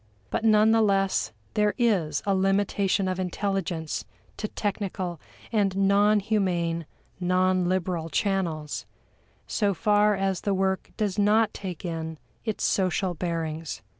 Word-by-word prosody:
But 225 - -1
none 215 0 +5
the 225 0 +4
less 195 - +2 0.2
there 210 -1 +2
is 190 - +1
a 200 - +2
limitation 195 0 +1
of 185 0 -2
intelligence 180 -3 -2 0.3
to 215 - -2
technical 190 -5 -3 0.3
and 200 -4 +1
non 200 +2 +4
humane, 175 -6 0 0.3
non 185 0 +2
liberal 180 -3 -1
channels, 170 -7 -1 0.6
so 200 -3 0
far 210 +1 +3
as 195 -2 -1
the 200 -1 0
work 190 0 0
does 210 -2 -1
not 210 +1 +3
take 185 -3 -6
in 160 -1 -4 0.3
its 220 -2 -2
social 185 -1 +1
bearings. 165 -2 -3
195 Hz, 130 wpm, -26 LUFS, 175-205 Hz, 0.6 s, none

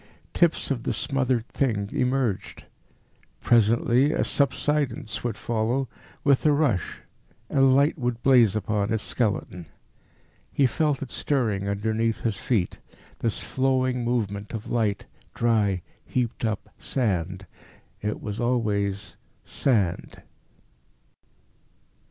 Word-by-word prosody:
Tips 170 -4 +2
of 125 -4 -1
the - - -1
smothered 130 -4 0
thing 110 -7 -1
emerged. 125 -5 -1 0.7
Presently 120 +4 +3
a - - +1
subsidence 140 -4 0
would 115 -4 -2
follow 115 +5 -1 0.4
with 140 -2 +3
a 150 - +5
rush 140 - 0 0.5
and 135 -1 +5
light 145 +3 +3
would 120 -2 -2
blaze 120 -6 +5
upon 105 0 -1
its 110 -1 0
skeleton. 95 -7 -2 0.8
He 140 - +3
felt 145 +3 +1
it 130 - -8
stirring 110 -8 0
underneath 110 +2 -1
his 110 -3 0
feet 100 -3 -1 0.4
this 115 -3 -1
flowing 130 -1 0
movement 105 -4 -2
of 110 -1 -6
light, 110 -4 0 0.3
dry, 105 -6 +1 0.2
heaped 120 -2 -2
up 110 -2 -2
sand. 95 -6 -2 0.6
It 105 0 -3
was 105 0 -4
always 105 -5 -1 0.3
sand. 105 -10 -1
115 Hz, 110 wpm, -25 LUFS, 105-130 Hz, 0.8 s, a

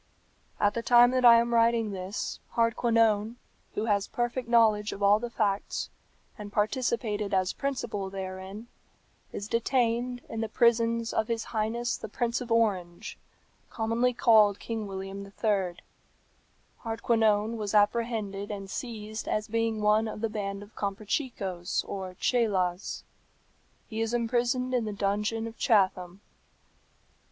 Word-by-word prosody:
"At 205 0 +3
the 235 - -2
time 240 +1 +6
that 255 0 +1
I 235 -1 +9
am 235 0 0
writing 230 -2 +3
this, 190 +1 -4 0.2
Hardquanonne, 230 -1 +2 0.4
who 210 - -1
has 205 -3 +1
perfect 240 0 -3
knowledge 215 -3 +3
of 200 - -6
all 205 +1 +5
the 240 +1 -4
facts, 205 -3 -1 0.5
and 205 -1 -7
participated 210 -2 -1
as 185 -1 +1
principal 240 -8 -3
therein, 190 +2 -7 0.7
is 200 - -5
detained 240 +1 0
in 225 - -4
the 225 - -2
prisons 230 0 +2
of 220 - 0
his 230 -1 -2
highness 230 +2 -2
the - - -8
Prince 240 +2 -1
of 245 -1 -7
Orange, 195 -5 0 0.5
commonly 230 +2 0
called 220 -4 +5
King 225 -2 -5
William 195 0 -6
III. 195 -3 -1 1.1
Hardquanonne 225 -1 +1
was 210 -1 -3
apprehended 210 -2 +1
and 195 -2 -6
seized 220 -3 -5
as 215 0 -1
being 225 -1 -1
one 210 +1 +3
of 215 - -6
the 225 - 0
band 200 -2 -4
of 205 - -17
Comprachicos 200 - -2
or 190 -2 -5
Cheylas. 190 -6 0 0.8
He 220 -1 -4
is 225 +1 0
imprisoned 245 +2 0
in 245 -3 +1
the 210 - -3
dungeon 210 +3 -1
of 230 0 -9
Chatham. 190 -5 +1
220 Hz, 135 wpm, -28 LUFS, 200-235 Hz, 1.1 s, I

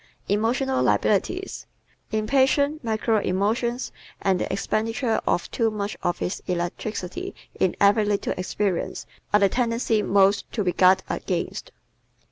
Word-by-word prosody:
Emotional 245 +6 +1
Liabilities - - 0 0.4
¶ 220 - 0
Impatience, 275 +6 +2
mercurial 220 -1 +1
emotions 230 +6 0 0.3
and 190 -2 +1
the - - -2
expenditure 225 +3 0
of 175 - 0
too 230 -2 +1
much 210 -1 -3
of 175 0 0
his 180 - -3
electricity 180 +1 -3 0.2
in 185 - +2
every 205 +2 +5
little 205 -1 0
experience 185 0 -2 0.3
are 210 - +5
the 200 - +6
tendencies 230 -1 +1
most 195 0 +3
to 215 - -1
be 180 -2 0
guarded 185 0 +5
against. - - -3
210 Hz, 130 wpm, -24 LUFS, 190-230 Hz, 0.4 s, the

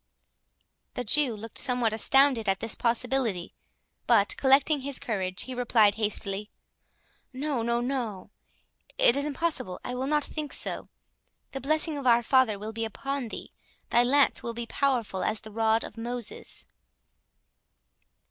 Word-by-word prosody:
The 250 - -2
Jew 250 +1 +2
looked 220 +1 -6
somewhat 245 -4 +2
astounded 255 -1 +4
at 195 0 +1
this 225 - +1
possibility; 235 -5 0 0.5
but - - +4
collecting 275 +2 +4
his 275 -1 -3
courage, 190 -7 -3
he 260 - -7
replied 235 -4 +3
hastily. 210 -1 -1 0.8
"No—no—no—It 240 -5 -2
is 280 +1 0
impossible—I 295 - -3
will 255 +2 -3
not 300 0 +1
think 300 -1 -5
so. - - -3 0.6
The 270 - -5
blessing 310 +1 0
of 265 - -3
Our 240 0 +5
Father 255 -4 +3
will 215 +2 -7
be 225 +1 -3
upon 270 +4 -4
thee. - - -8 0.4
Thy 240 - +5
lance 275 +3 +3
will 235 -1 -5
be 235 0 -4
powerful 235 -6 -1
as 215 - -1
the 215 - -11
rod 225 +1 +1
of - - -9
Moses." 240 -1 -5
240 Hz, 135 wpm, -27 LUFS, 220-275 Hz, 0.8 s, Our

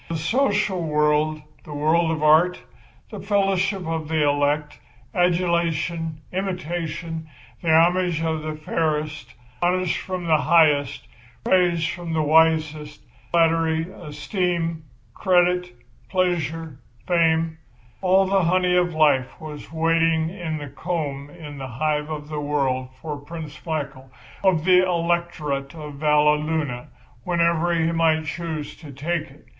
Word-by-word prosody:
The 165 - -2
social 205 - +1
world, 150 0 +1 0.2
the 150 - -8
world 160 +3 +2
of 160 -1 -2
art, 160 +4 +5 0.5
the 210 - -6
fellowship 195 -1 0
of 160 -1 -3
the 155 -2 +1
elect, 145 -1 0 0.3
adulation, 170 -2 0
imitation, 170 -3 -4 0.3
the 170 - -2
homage 170 +1 +4
of 160 -1 -1
the 155 0 -4
fairest, 155 -4 -2 0.3
honours 180 0 +1
from 185 -2 -4
the 160 -2 +3
highest, 150 -5 +3 0.4
praise 175 -1 +2
from 170 -1 -4
the 155 -1 +1
wisest, 155 -1 +2 0.3
flattery, 165 -1 +2
esteem, 165 0 -3 0.3
credit, 180 -1 +2 0.4
pleasure, 165 -6 -1 0.3
fame—all 165 0 +1
the 190 -2 +2
honey 180 +1 +2
of 175 -2 +1
life 145 -5 +2
was 155 -1 -9
waiting 165 0 +2
in 170 -4 -4
the 145 -1 -6
comb 145 -2 -4
in 150 -3 -10
the 135 - -5
hive 150 +4 -1
of 150 -1 -5
the 150 -1 -4
world 135 -3 -1
for 150 -1 -5
Prince 150 0 -9
Michael, 140 -4 -4 0.3
of 175 -5 +2
the 185 0 +6
Electorate 170 -5 -1
of 150 -3 -8
Valleluna, 150 -3 +1 0.4
whenever 170 0 +1
he 165 0 +1
might 160 -1 +2
choose 155 -2 -5
to 150 -4 -11
take 155 +3 -3
it. 140 +3 -19
160 Hz, 125 wpm, -23 LUFS, 150-175 Hz, 0.5 s, the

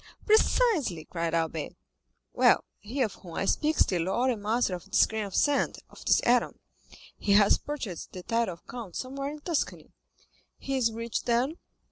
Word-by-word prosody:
"Precisely!" 420 - +3
cried 170 -1 -2
Albert. 160 -2 -2 0.6
"Well, - - +4 0.2
he 255 +6 -2
of 215 - -2
whom 170 -4 -11
I - - -1
speak 305 +8 +1
is - - +5
the 180 - -1
lord 215 +10 +1
and 220 -4 -4
master 220 -1 +1
of 180 0 -6
this 210 - +5
grain 220 -1 -3
of 195 - -7
sand, 290 -1 +2
of - - -13
this - - +4
atom; - - +2 0.6
he 200 - +2
has 205 0 +5
purchased 245 - -6
the 180 - -8
title 230 -3 0
of 170 - -27
count 230 -7 -8
somewhere 275 +2 -4
in 300 0 -8
Tuscany." 330 -1 -2 0.7
"He 275 - -3
is 240 -3 +2
rich, 230 +1 -4
then?" 250 +7 +1
230 Hz, 180 wpm, -28 LUFS, 190-275 Hz, 0.7 s, is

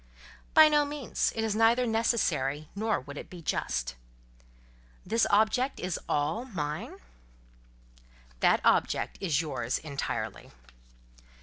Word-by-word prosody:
"By 315 -1 +9
no 295 -1 +4
means. 285 -3 -2
It 225 - -1
is 220 -2 -1
neither 230 +3 +4
necessary, 160 - 0
nor 220 +1 0
would 145 +2 -9
it - - -10
be 175 -2 -11
just." 60 - -2 1.1
"This 230 0 +2
object 220 +6 +2
is 180 -2 -3
all 150 +11 0
mine?" 155 - -4 1.4
"That - - +4
object - - +1
is 165 -5 +1
yours 125 -6 -2
entirely." 140 -3 -4
200 Hz, 115 wpm, -29 LUFS, 150-230 Hz, 1.4 s, By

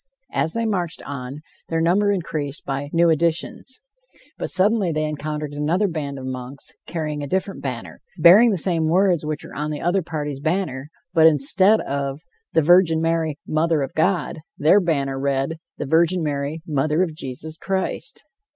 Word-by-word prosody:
As 160 - 0
they 230 0 -1
marched 180 -6 -2
on, 140 +1 -6 0.3
their 165 - 0
number 190 +5 +3
increased 155 -6 -3
by 140 +1 -3
new 170 0 +4
additions. 170 - -1 0.6
But - - -3
suddenly 195 -1 +3
they 155 0 -1
encountered 150 -1 -4
another 160 +8 +1
band 145 -5 -4
of 130 - -7
monks, 130 +1 -6 0.2
carrying 150 -3 -3
a 145 - -4
different 190 +5 -2
banner, - - -6 0.2
bearing 200 +8 +8
the 200 - +1
same 165 -2 0
words 180 -1 +3
which 150 0 -4
were - - -11
on 150 +1 -2
the 150 -1 -4
other 180 +3 +1
party's 150 -4 -4
banner, 155 -3 -2 0.2
but 160 -2 +7
instead 185 +8 +4
of 140 +1 -3 0.3
"The 160 - +4
Virgin 175 0 +5
Mary, 165 -2 0
Mother 155 -1 +1
of 135 - -5
God," 170 -1 0 0.2
their 160 +7 +5
banner 140 -7 -1
read: 140 +3 -1 0.2
"The - - -3
Virgin 170 +4 +3
Mary, 145 +1 -3
Mother 155 +3 +1
of 170 -4 -3
Jesus 155 +2 -7
Christ." 195 +9 -3
160 Hz, 170 wpm, -22 LUFS, 145-175 Hz, 0.6 s, bearing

